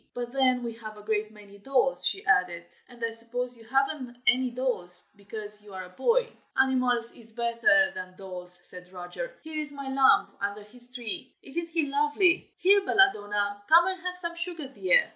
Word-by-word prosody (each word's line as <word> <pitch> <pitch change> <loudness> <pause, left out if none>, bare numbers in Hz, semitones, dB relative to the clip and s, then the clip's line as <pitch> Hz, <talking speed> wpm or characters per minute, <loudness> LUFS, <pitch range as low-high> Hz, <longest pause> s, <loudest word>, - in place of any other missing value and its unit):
But 240 -1 -5
then 255 -2 +2
we 235 -1 -4
have 215 -2 -10
a 210 - -12
great 215 0 -1
many 205 -2 -16
dolls," 270 +3 +4
she 390 +2 +2
added, 175 - +2 0.2
"and 240 -2 -5
I 230 - -3
suppose 245 +2 -1
you 230 - -16
have'nt 265 0 -1
any 255 +1 +3
dolls, 240 -9 -3
because 210 +1 -6
you 205 -2 -13
are 185 - -5
a 180 - -12
boy." 470 - +1 0.3
"Animals 250 -3 +2
is 225 -2 -13
better 235 +5 +3
than 185 0 -8
dolls," 180 -2 -10
said 180 0 -13
Roger. 185 - -7
"Here 315 -1 -5
is 300 -1 -1
my 275 -2 -6
lamb, 265 -1 +4
under 200 +1 -3
this 245 +4 -19
tree. 235 -4 -5
Isn't 335 +5 -2
he 330 -2 +2
lovely? 300 +6 +2
here, 400 +2 +5
Belladonna, 205 - +1
come 335 +2 +7
and 375 0 -2
have 360 0 -4
some 340 -1 -4
sugar, 340 -3 -4
dear!" 485 - +2
245 Hz, 185 wpm, -27 LUFS, 210-295 Hz, 0.3 s, come